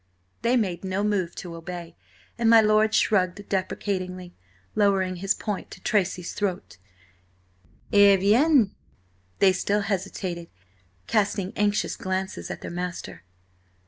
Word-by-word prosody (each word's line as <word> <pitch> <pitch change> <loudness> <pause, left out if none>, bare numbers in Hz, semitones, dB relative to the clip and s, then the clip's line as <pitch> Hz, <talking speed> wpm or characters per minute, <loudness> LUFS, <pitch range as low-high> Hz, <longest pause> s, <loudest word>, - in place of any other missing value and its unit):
They 240 +2 +2
made 185 -6 -1
no 190 +1 -1
move 195 -5 0
to 175 -2 -7
obey, 170 0 -8 0.4
and 235 -1 +2
my 230 0 +8
lord 215 0 +3
shrugged 200 -1 +1
deprecatingly, 185 -2 -3 0.4
lowering 195 -3 +2
his 195 +2 0
point 210 -3 -4
to - - -11
Tracy's 185 -4 0
throat. 175 - -3 1.1
"Eh 200 -1 +7
bien!" 225 - +4 0.6
They 190 -1 +5
still 205 +2 0
hesitated, 185 -3 -3 0.6
casting 200 -3 0
anxious 205 0 0
glances 190 0 -4
at - - -6
their - - -6
master. 180 - -5
195 Hz, 120 wpm, -25 LUFS, 180-210 Hz, 1.1 s, my